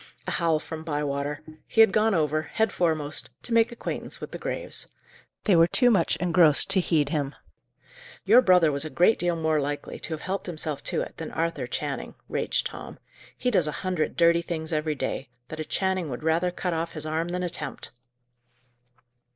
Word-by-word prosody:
A - - -3
howl 165 -2 +2
from 160 +1 -7
Bywater. 145 -2 -2 0.2
He - - -2
had 220 -3 +8
gone 215 0 +3
over, 155 -1 +1
head 220 +7 -1
foremost, 155 -4 -1
to 240 - -2
make 230 +1 +4
acquaintance 235 - -5
with - - -7
the - - -6
graves. - - -4 0.6
They 200 - +4
were 165 0 +6
too 245 +6 +4
much 180 -7 +2
engrossed 170 -1 +5
to 195 - +5
heed 155 -5 +1
him. 145 -2 -2 0.9
"Your 245 - +7
brother 180 -7 +5
was 140 0 -2
a 155 - -5
great 180 +8 +3
deal 175 -1 +1
more 160 -2 +1
likely 145 +1 -4
to 165 - -3
have 155 - -11
helped 190 +1 -3
himself 155 -4 -3
to - - 0
it, - - -7
than 160 - -5
Arthur 165 0 -2
Channing," - - -4
raged - - -1
Tom. - - -7 0.4
"He 250 - 0
does 180 -8 +3
a - - -1
hundred 180 -4 -1
dirty 170 0 +5
things 165 -1 -4
every 155 0 0
day, 135 -1 -3 0.2
that 155 - -7
a - - -1
Channing 185 0 -1
would 125 +2 -6
rather 165 +3 +2
cut 180 0 -3
off 165 +1 -3
his 155 -1 -6
arm 160 +2 -1
than 180 +1 -3
attempt." 165 -9 -5
165 Hz, 190 wpm, -26 LUFS, 155-180 Hz, 0.9 s, had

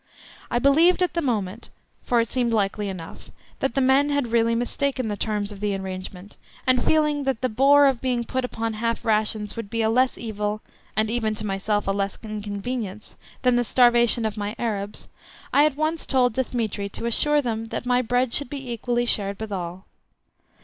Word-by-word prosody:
I 240 - 0
believed 320 +8 +4
at 360 - 0
the 340 - 0
moment 220 - -2 0.3
(for 240 - +1
it 230 - +1
seemed 245 0 0
likely 205 -1 0
enough) 175 -4 -8 0.3
that 270 - -1
the 270 - +2
men 265 +2 +4
had 285 -5 0
really 230 0 +3
mistaken 255 +1 -1
the 205 - -2
terms 210 0 -2
of 205 - -9
the 205 -1 -1
arrangement, 190 0 -7 0.3
and 255 -1 +3
feeling 300 -2 +2
that 265 -4 -1
the 255 - +1
bore 275 +5 +5
of 265 -4 +2
being 250 -2 0
put 260 +2 -2
upon 225 -2 -3
half 230 +2 -2
rations 215 -1 0
would 230 -3 -6
be 230 +1 -1
a 220 - +2
less 255 +2 +2
evil 210 -1 -3 0.3
(and 215 +1 +1
even 220 -2 0
to 215 - -6
myself 205 +1 -1
a - - +3
less 195 0 -2
inconvenience) 215 0 -5 0.3
than 250 -1 +4
the 245 - +2
starvation 240 -1 +4
of 215 -1 -2
my 205 +1 -3
Arabs, 210 -3 -3 0.5
I 290 - +6
at 305 - +1
once 310 +1 -1
told 250 -3 +3
Dthemetri 220 -5 -2
to - - -5
assure 295 +6 +3
them 225 -4 -2
that 225 - -5
my 250 0 +3
bread 245 0 0
should 285 -4 +1
be 270 -3 -6
equally 240 +1 -1
shared 200 -4 -1
with 220 -1 -5
all. 180 0 -5
230 Hz, 195 wpm, -24 LUFS, 210-255 Hz, 0.5 s, I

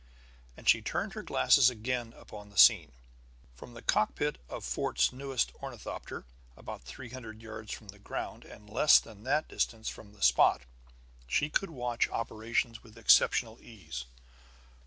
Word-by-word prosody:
And - - -12
she - - +6
turned - - -3
her - - -5
glasses 120 - +5
again 120 0 -3
upon 105 -3 -12
the 100 - -16
scene. 80 -4 +7 0.6
From 120 - -13
the 115 - -11
cockpit 145 +7 +1
of - - -6
Fort's 60 +1 0
newest 135 -1 -2
ornithopter, - - -7 0.3
about - - -8
three 70 - -10
hundred 115 -3 -9
yards 110 -1 -8
from 105 - -8
the 100 +1 -11
ground - - -6
and 105 - -14
less 120 +8 +6
than 105 -3 -13
that 150 +4 +1
distance 110 -1 -2
from 105 -1 -11
the 105 - -8
spot, - - +5 0.6
she 150 - 0
could 195 - 0
watch 125 -5 -1
operations 115 +1 -2
with 110 -2 -17
exceptional 115 0 +4
ease. 80 - -8
110 Hz, 155 wpm, -31 LUFS, 105-125 Hz, 0.6 s, scene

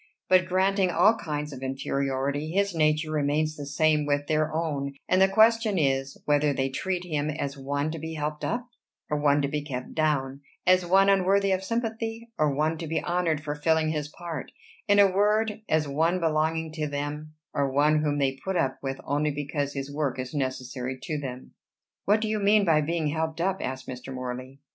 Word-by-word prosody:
But 185 -1 +5
granting 190 +1 +2
all 180 +6 +4
kinds 150 -7 -4
of 130 - -9
inferiority, 135 +2 -2
his 200 +2 +1
nature 155 -1 +1
remains 155 +1 0
the 145 -2 -7
same 150 +1 +2
with 145 0 +1
their 155 0 +1
own; 145 -4 -2
and 185 - +3
the 190 - +7
question 220 +1 +4
is, 135 -3 0
whether 145 0 +3
they 135 0 0
treat 180 +6 -2
him 150 -3 -1
as 140 -2 -3
one 140 +2 -2
to 165 - -5
be 160 +1 -5
helped 150 0 -3
up, 240 +2 -1 0.5
or 150 - +2
one 145 0 +3
to - - +2
be 150 +1 -2
kept 130 -4 -6
down; 145 -3 0 0.2
as 185 0 +5
one 195 +2 +5
unworthy 195 0 +3
of 190 0 0
sympathy, 230 +1 -3
or 150 -1 +3
one 155 +3 0
to 165 - -5
be 160 - 0
honored 170 -3 0
for 145 -1 -2
filling 160 +1 +1
his 150 -2 -2
part: 165 -1 -7 0.4
in 205 -1 +4
a 200 - +8
word, 210 +3 +1
as 155 -1 +2
one 165 +6 +1
belonging 160 0 0
to 155 -1 -3
them, 145 +2 -5 0.2
or 140 -1 0
one 150 +3 +3
whom 145 -1 0
they 135 -1 0
put 190 0 -2
up 135 -6 0
with 135 -1 -4
only 145 +2 0
because 145 0 -3
his 140 0 -5
work 145 -4 -1
is 130 0 -5
necessary 130 -2 -3
to 150 +3 -3
them." 130 -2 -7 0.5
"What 210 +2 +3
do 220 - -1
you 215 0 0
mean 205 0 +4
by 160 -3 +4
being 160 0 -1
'helped 160 +1 -2
up'?" 190 +2 0
asked 130 0 -4
Mr. 125 +1 -7
Morley. 130 +1 -6
155 Hz, 200 wpm, -27 LUFS, 140-180 Hz, 0.5 s, a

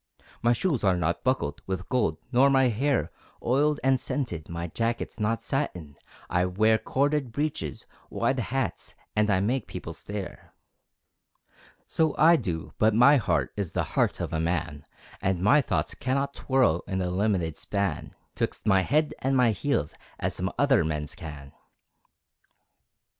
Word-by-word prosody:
My 120 - +3
shoes 135 - 0
are 95 -2 +3
not 85 0 -1
buckled 130 - 0
With 95 0 -3
gold, 115 -11 +1
nor 135 +2 +5
my 135 -2 +4
hair 130 +4 0 0.3
Oiled 145 +5 +2
and 135 -1 +3
scented, 90 - -3
my 85 0 -4
jacket's 115 +8 -3
Not 115 +1 0
satin, 90 - -3 0.3
I 90 +1 +1
wear 110 +4 +3
Corded 140 -2 0
breeches, 130 - -3 0.2
wide 130 +3 0
hats, 125 -1 -3 0.2
And 105 0 +2
I 95 -2 +3
make 125 +6 -1
people - - -7
stare! 100 -2 -7 1.3
So 160 -2 +1
I 165 +2 +7
do, 85 - -3
but 110 0 +4
my 140 +5 +7
heart 115 - 0
Is 100 -6 -3
the - - 0
heart - - +1
of - - -4
a 80 - 0
man, 80 -3 -2 0.4
And 95 -1 0
my 140 +9 +6
thoughts - - -1
cannot 140 +1 -1
twirl 130 - +1
In 95 - -2
the 90 -1 -1
limited 90 -5 0
span 100 -6 -3 0.2
'Twixt - - -3
my 95 -3 +4
head 150 - +1
and 135 0 +1
my 125 -3 +4
heels, 105 - -1 0.2
As - - -2
some 95 +1 -2
other 135 -8 +4
men's 75 0 -3
can. 75 -6 -9
110 Hz, 155 wpm, -27 LUFS, 90-135 Hz, 1.3 s, I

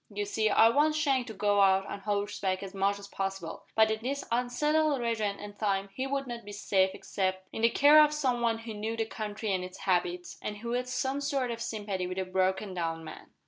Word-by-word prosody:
You 205 0 -2
see, 215 +1 +1
I 225 +2 +6
want 300 +5 +3
Shank 275 -5 +1
to 220 - -6
go 205 0 +2
out 195 0 +4
on 200 - -6
horseback 200 -2 -2
as 195 0 -7
much 200 +1 +1
as 200 0 -10
possible, 195 -4 -5
but 220 0 +5
in 220 0 -2
this 275 +4 -3
unsettled 290 +5 +1
region 220 -4 -1
and 205 0 -9
time 195 -2 0
he 260 +4 -3
would 275 0 -1
not 240 -2 -6
be 205 - -9
safe 190 -2 +2
except 190 -1 -2
in - - -4
the 230 - +5
care 295 +4 +7
of 300 - +3
some 260 -5 0
one 230 -1 +2
who 225 0 -7
knew 220 +2 -3
the 225 - 0
country 215 -1 -4
and 185 -1 -1
its 185 +1 -9
habits, 175 -2 -1
and 210 - -4
who 235 +3 -5
had 250 +1 -1
some 265 +2 -1
sort 275 -4 -1
of 230 0 -5
sympathy 205 -5 -3
with 185 +1 -5
a 190 - -1
broken 190 +1 0
down 165 -2 -3
man." - - -10
210 Hz, 230 wpm, -30 LUFS, 195-245 Hz, -, care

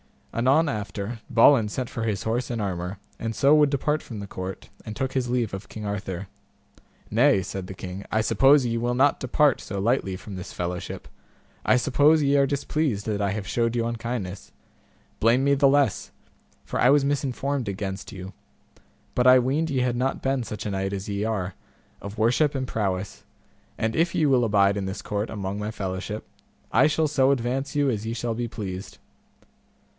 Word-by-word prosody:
Anon 135 +7 +3
after, 105 0 -4
Balin 115 -1 +6
sent 125 +3 -3
for 115 - -4
his 110 -1 -1
horse 115 +3 -1
and 120 -3 -2
armour, 90 -1 -3 0.2
and 115 0 -3
so 140 +2 +4
would 150 -1 +5
depart 150 +2 0
from 110 -4 -8
the 100 - -5
court, 95 -1 -7
and 110 - -7
took 130 +1 -2
his 125 -2 -1
leave 120 -4 0
of 95 +1 -6
King 110 -1 -7
Arthur. 100 -2 -4 0.8
Nay, 120 -2 +4
said 95 0 -5
the 95 - -8
king, 95 +2 -7
I 110 - +2
suppose 135 +5 +5
ye 115 -1 0
will 120 +1 0
not 140 +3 +3
depart 135 +2 +2
so 100 - -6
lightly 100 -3 +1
from 95 +1 -8
this 90 - -8
fellowship, 90 0 -5 0.6
I - - +5
suppose 145 +4 +4
ye 140 0 +3
are 140 0 +4
displeased 140 -5 -1
that 105 -2 -1
I 100 -1 +1
have 100 0 -4
shewed 115 +4 0
you 115 -1 0
unkindness; 115 -5 -4 0.7
blame 120 +4 +4
me 140 0 +4
the 140 0 +4
less, 140 0 +2 0.5
for - - -4
I 125 - +5
was 140 0 +5
misinformed 140 -2 -1
against 95 0 -5
you, 95 0 -8 0.8
but 125 0 +2
I 130 0 +9
weened 140 +6 +1
ye 135 -3 0
had 125 -1 0
not 130 +2 -1
been 135 -2 0
such 105 -1 -6
a 105 - -2
knight 95 0 -2
as 100 +1 -4
ye 100 +1 -1
are, 100 -4 -2 0.5
of 100 +2 -8
worship 125 +7 +2
and 130 -1 -1
prowess, 95 -4 -3 0.5
and 110 0 -1
if 170 +1 +2
ye 155 - +3
will 130 -4 +4
abide 100 -2 +3
in 100 - -2
this 95 +1 -5
court 105 +1 -2
among 100 -1 -4
my 105 +1 -3
fellowship, 100 0 -4 0.5
I - - +5
shall 155 0 +1
so 135 -2 +3
advance 135 +2 -1
you 145 -1 +3
as 110 -1 -3
ye 115 - -2
shall 120 -1 -2
be 120 +1 -3
pleased. 95 -5 -6
115 Hz, 195 wpm, -25 LUFS, 100-135 Hz, 0.8 s, I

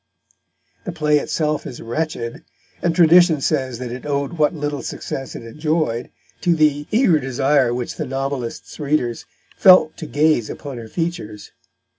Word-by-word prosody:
The 185 - -3
play 150 -3 +2
itself 150 +1 -2
is 120 - -8
wretched, 120 -1 -4 0.4
and 170 -1 0
tradition 170 -1 +6
says 130 -3 -1
that 125 -1 -6
it 125 +1 -7
owed 140 +2 -2
what 155 -1 +1
little 145 -2 -3
success 135 -1 -6
it - - -7
enjoyed 150 -1 -2 0.3
to 175 -2 +2
the 150 -1 +2
eager 215 - +3
desire 135 0 +2
which 120 0 -4
the 155 - -3
novelist's 135 -2 -4
readers 140 -5 -1 0.3
felt 185 -4 +6
to 155 - -7
gaze 145 -4 +2
upon 140 -4 -7
her 115 - -8
features. 110 - -4
145 Hz, 150 wpm, -20 LUFS, 125-160 Hz, 0.4 s, tradition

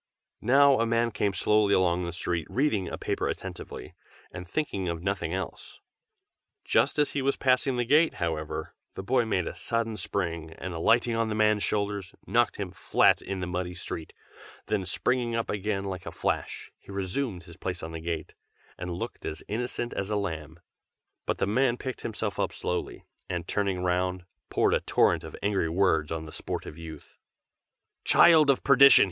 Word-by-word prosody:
Now 135 +3 +5
a 115 - +2
man 115 0 +2
came 105 -1 0
slowly 105 +1 +3
along 90 -1 +2
the 85 - -3
street, 85 -1 -2
reading 115 - +1
a - - -5
paper - - -1
attentively, - - -6 0.4
and 90 -1 -8
thinking 100 - -2
of 85 0 -4
nothing 95 -4 -1
else. 95 +1 -5 0.9
Just - - +2
as 150 -1 +2
he 140 - -1
was 135 +1 +1
passing 130 0 +2
by 120 - +1
the - - -6
gate, 155 +6 +4
however, 80 -2 -3 0.2
the 95 - -5
boy 120 +3 +2
made 95 -6 0
a - - -4
sudden 115 +6 -2
spring, 85 -6 -3
and 95 0 -5
alighting 115 +8 +3
on 115 -1 +1
the 110 - -1
man's 105 -1 +3
shoulders, 100 -2 -2
knocked 120 0 +2
him 100 -3 -4
flat - - +3
in 95 -1 -4
the - - -1
muddy 90 0 -3
street; 80 -2 -6 0.5
then 105 -3 -1
springing 120 +7 0
up 115 - -1
again 105 -1 -1
like 95 -2 -5
a - - -4
flash, - - -3
he - - -13
resumed 95 +1 -3
his 85 -1 -14
place 90 -3 -4
on 80 - -5
the 80 0 -6
gate, 80 -2 -4 0.5
and 90 -1 -4
looked 90 - -6
as 80 - -5
innocent 120 +2 -3
as 100 0 -3
a 105 - 0
lamb. 80 -5 -4 0.7
But - - 0
the - - +1
man 120 +4 +2
picked 130 0 -5
himself 110 -2 -3
up - - 0
slowly, 90 - -4 0.2
and 85 -1 -3
turning 100 -3 0
round, 90 0 0 0.2
poured - - +2
a - - +3
torrent - - +2
of - - -8
angry 100 -5 +1
words 85 -4 +2
on 80 -1 -3
the 75 - -9
sportive 75 - -4
youth. 80 -2 -10 0.8
"Child 160 -4 +6
of 135 - +3
perdition!" 140 0 +8
100 Hz, 185 wpm, -28 LUFS, 85-115 Hz, 0.9 s, perdition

